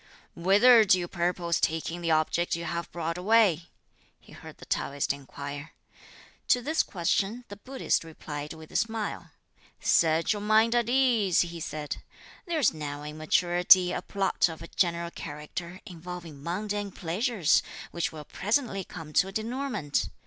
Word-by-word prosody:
"Whither 205 +7 +6
do 185 -3 +5
you 175 -1 -3
purpose 175 -1 -1
taking 165 +2 -1
the 170 - -1
object 160 +2 +1
you 170 0 -5
have 170 +1 -4
brought 170 0 -3
away?" 185 -5 +3 0.5
he - - -20
heard - - -12
the - - -12
Taoist 140 0 -1
inquire. 140 +1 -8 0.7
To 250 - +4
this 315 +5 +2
question 195 +6 -1
the 205 - -7
Buddhist 255 +1 -1
replied 150 -2 -7
with 160 -1 -13
a - - -13
smile: 220 -2 -2 0.5
"Set 165 +3 +3
your 205 - -5
mind 220 +2 +4
at 240 -1 +1
ease," 240 -8 +3
he 170 -1 -4
said; 155 -2 -5 0.5
"there's 320 - +2
now 145 -2 -6
in 150 +1 -7
maturity 180 +3 +5
a - - -2
plot 195 -3 +1
of 160 - -8
a - - -10
general 170 -1 0
character 165 +4 -7
involving 170 -4 -9
mundane 205 +5 -3
pleasures, 190 - +1 0.3
which 170 - -2
will 155 -2 -9
presently 210 - -1
come 160 -4 -10
to 190 - +4
a - - -7
denouement. 220 - -2
175 Hz, 155 wpm, -28 LUFS, 160-210 Hz, 0.7 s, Whither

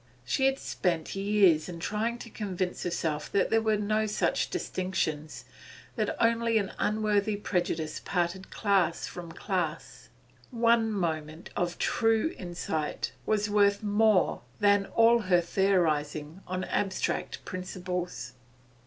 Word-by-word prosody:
She 265 - +2
had 270 0 +1
spent 170 - -2
years 195 -5 +3
in 170 -1 -7
trying 220 +6 -1
to 235 - -9
convince 185 -4 -3
herself 160 -4 -2
that 200 - +2
there 225 0 +4
were 220 -1 +2
no 215 +1 0
such 210 - 0
distinctions, 155 -5 -3 0.5
that - - -1
only 230 0 +3
an 200 -3 -1
unworthy 210 -1 +1
prejudice 175 -6 -2
parted 175 +2 -1
class 200 -5 +1
from 175 -2 -8
class. 170 -3 -3 0.4
One 230 -2 +3
moment 160 -4 -3
of 175 0 -1
true 225 +8 +2
insight 170 -4 -3 0.2
was 210 -1 +2
worth 205 0 +3
more 210 -2 +3 0.2
than 205 -1 +4
all 230 +1 +5
her 185 -5 +3
theorising 165 -3 0
on 185 0 -2
abstract 190 0 -2
principles. 180 -8 -4
190 Hz, 125 wpm, -29 LUFS, 175-215 Hz, 0.5 s, all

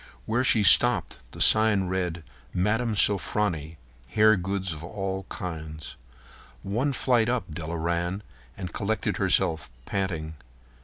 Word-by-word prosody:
Where 120 +3 0
she 115 -4 +3
stopped - - +5
the - - -12
sign 110 -3 +5
read: 90 -2 -3 0.3
"Mme. 110 +5 0
Sofronie. 95 -6 +1 0.3
Hair 110 +9 +4
Goods 95 -1 -3
of 75 0 -9
All 95 +1 -5
Kinds." 80 -4 -7 0.7
One 120 +9 -1
flight 120 -3 +1
up 120 -10 -2
Della 80 +2 -5
ran, 85 +4 -2 0.3
and 90 -3 -7
collected 110 +1 -2
herself, 80 -6 0 0.2
panting. 85 -6 -3
95 Hz, 120 wpm, -26 LUFS, 85-105 Hz, 0.7 s, stopped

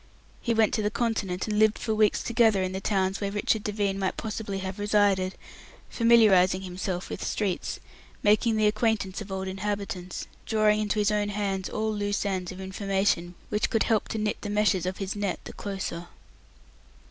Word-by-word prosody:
He 235 -2 0
went 220 -1 +3
to 220 - +1
the 210 - +1
Continent, 210 -5 -1
and 210 -1 0
lived 215 0 +4
for 220 - -2
weeks 215 -1 +2
together 225 -4 +3
in 185 - -2
the 190 +1 -4
towns 195 -1 0
where 200 - 0
Richard 205 +1 0
Devine 205 -2 -1
might 190 -1 -1
possibly 215 -2 -4
have 190 +1 -5
resided, 205 -3 +2 0.6
familiarizing 200 -6 +5
himself 180 0 -4
with - - -5
streets, 195 -4 -2 0.4
making 215 +2 +4
the 215 0 +2
acquaintance 210 -2 +1
of 205 -1 -8
old 190 0 -3
inhabitants, 190 -2 -4 0.2
drawing 215 -1 +3
into 215 0 -1
his 210 0 +2
own 210 -1 0
hands 195 -2 -2
all 220 0 -1
loose 205 0 -1
ends 185 -3 -2
of 185 - -9
information 190 -2 -1
which 210 - 0
could 225 - +2
help 220 -3 +1
to - - -4
knit 210 -1 -1
the 205 - -4
meshes 205 -4 +2
of 185 - -3
his 195 0 -3
net 200 -3 -2
the - - -9
closer. 190 -4 -5
205 Hz, 180 wpm, -27 LUFS, 190-215 Hz, 0.6 s, familiarizing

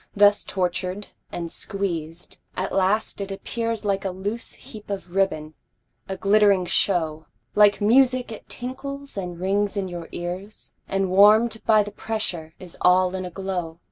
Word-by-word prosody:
Thus 205 0 +5
tortured 185 +1 -2 0.2
and 170 -1 -4
squeezed, 175 -5 -4 0.2
at 190 +1 -2
last 200 +2 +1
it 195 0 -4
appears 230 +2 -3
Like 195 -1 0
a 195 - -1
loose 200 +5 -4
heap 210 -2 -12
of 190 -3 -5
ribbon, 155 -6 0 0.6
a 190 - -3
glittering 200 -2 +4
show, 160 -4 0 0.3
Like 205 -1 +5
music 250 +2 +4
it 220 - -10
tinkles 275 +3 -6
and 180 -3 -5
rings 200 +2 0
in 195 -1 -1
your 175 -2 -7
ears, 180 +4 -6
And 195 -1 0
warm'd 215 +4 +5
by 215 -2 +6
the 205 - -7
pressure 190 -7 -3
is 180 -3 -11
all 180 0 +4
in 185 -1 -3
a - - -5
glow. 180 -3 -4
195 Hz, 155 wpm, -24 LUFS, 180-210 Hz, 0.6 s, by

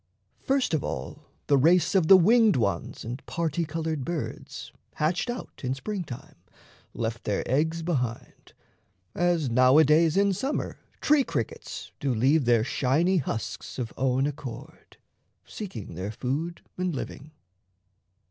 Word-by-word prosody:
First 270 - 0
of 155 - +1
all, - - -5 0.2
the 140 -1 +4
race 170 +6 +4
Of 185 -5 +3
the 190 - +10
winged 220 +3 +5
ones 105 -3 -1
and 120 +4 -6
parti 170 0 -1
coloured 160 -3 -3
birds, 170 +1 -5 0.2
Hatched 170 +9 0
out 245 +1 -6
in 130 +1 -1
spring 195 +7 -4
time, 145 +2 -10 0.6
left 115 0 -3
their 105 - -1
eggs 160 +5 0
behind; 125 -9 -3 0.6
As 170 -6 +1
now 130 +3 +5
a 160 - +8
days 160 +3 +4
in 200 0 +4
summer 270 +10 -3 0.2
tree 295 -2 +4
crickets 115 - -5
Do 135 -3 0
leave 135 +5 +3
their 120 -2 +4
shiny 150 +9 +2
husks 115 -7 -4
of 120 -4 -4
own 130 +1 +1
accord, 135 -5 -7 0.5
Seeking 125 - -7
their 95 +5 -4
food 145 +9 -3 0.2
and 180 -4 -1
living. 140 +2 -6
150 Hz, 140 wpm, -27 LUFS, 125-175 Hz, 0.6 s, the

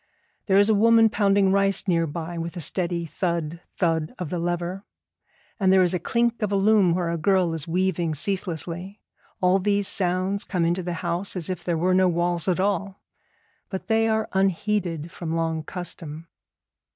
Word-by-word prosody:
There 195 -1 +4
is 200 0 +6
a 220 - +4
woman 225 +1 +5
pounding 200 -2 +2
rice 195 0 +1
near 165 -2 +2
by 165 +3 -5
with 170 +2 -5
a - - -3
steady 170 +2 0
thud, 170 -1 -3 0.2
thud 165 -3 0
of 180 -5 -5
the 180 - -2
lever, 175 +2 -3 0.8
and 190 -2 +3
there 190 -1 +5
is 180 0 +3
a 180 - 0
clink 235 +5 0
of 210 -2 -1
a - - +1
loom 195 -3 +4
where 175 -2 -1
a 170 - -2
girl 185 0 +2
is 160 -2 -4
weaving 175 -2 0
ceaselessly. 180 +2 -2 0.4
All 185 +1 +4
these 200 0 +1
sounds 185 +2 0
come 175 -3 -1
into 175 +2 0
the 175 0 -4
house 175 +4 -2
as 180 0 -3
if 175 -2 -5
there 170 -2 -1
were 180 +3 +1
no 185 0 +4
walls 175 0 -1
at 185 -1 +1
all, 195 0 -1 0.7
but 190 +2 -6
they 225 0 +3
are 220 0 0
unheeded 190 -4 0
from 165 -2 -4
long 165 -1 -1
custom. 165 -2 -8
180 Hz, 185 wpm, -24 LUFS, 170-195 Hz, 0.8 s, is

